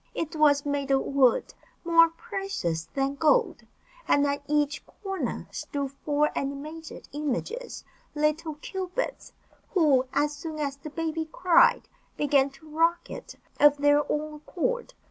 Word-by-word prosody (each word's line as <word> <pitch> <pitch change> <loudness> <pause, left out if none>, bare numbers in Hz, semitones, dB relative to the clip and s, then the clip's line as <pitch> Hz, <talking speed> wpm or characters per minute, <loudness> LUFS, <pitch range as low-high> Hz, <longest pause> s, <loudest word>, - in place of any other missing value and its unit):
It 325 0 -3
was 290 -2 +4
made 285 -1 -1
of 270 -1 +3
wood 265 -4 +2 0.3
more 330 -1 +6
precious 390 - -4
than 275 0 0
gold, 325 - +2 0.4
and 285 0 +4
at 285 0 -1
each 295 0 0
corner 390 -2 -4
stood 280 -2 -4
four 295 +2 0
animated 300 +4 -5
images, 300 - -4 0.3
little 305 +1 0
cupids, 375 +8 -4 0.4
who, 280 -7 +4
as 295 0 +1
soon 310 +1 -6
as 280 -2 -2
the 295 +2 -8
baby 320 0 -3
cried, 360 -2 +4 0.3
began 280 -2 +3
to 280 +3 -18
rock 330 +3 +1
it - - -8 0.2
of 290 0 +6
their 290 0 +4
own 305 +1 -2
accord. 470 +11 -3
300 Hz, 135 wpm, -27 LUFS, 280-330 Hz, 0.4 s, more